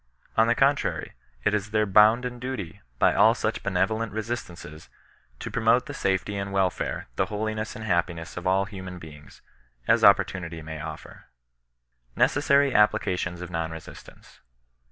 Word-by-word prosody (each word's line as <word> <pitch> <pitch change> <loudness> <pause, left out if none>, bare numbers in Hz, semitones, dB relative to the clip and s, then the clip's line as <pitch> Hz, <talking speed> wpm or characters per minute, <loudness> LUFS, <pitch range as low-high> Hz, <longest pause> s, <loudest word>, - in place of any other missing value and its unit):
On 110 +1 +4
the 120 - +3
contrary, 140 +2 +1 0.3
it 105 - +2
is 105 -1 -1
their 105 0 +1
bounden 110 +5 +4
duty, 120 - -6 0.2
by - - +4
all - - +5
such - - -2
benevolent 110 0 -1
resistances, 100 -8 -6 0.5
to - - -7
promote - - +2
the - - -7
safety 95 +1 -1
and 100 0 -4
welfare, 95 -2 -1
the - - +1
holiness 110 +1 -3
and 110 - -7
happiness 85 -3 -1
of 90 +1 -4
all 95 +1 +2
human 95 -2 -8
beings, 75 -4 -13 0.4
as - - +3
opportunity 85 -3 +3
may 80 0 -7
offer. - - -9 0.9
NECESSABT 140 -1 +3
APPLICATIONS 90 -5 +1
OF 90 - -8
NON 85 -1 -2
BESISTANCE. 80 -2 -12
100 Hz, 145 wpm, -26 LUFS, 85-110 Hz, 0.9 s, all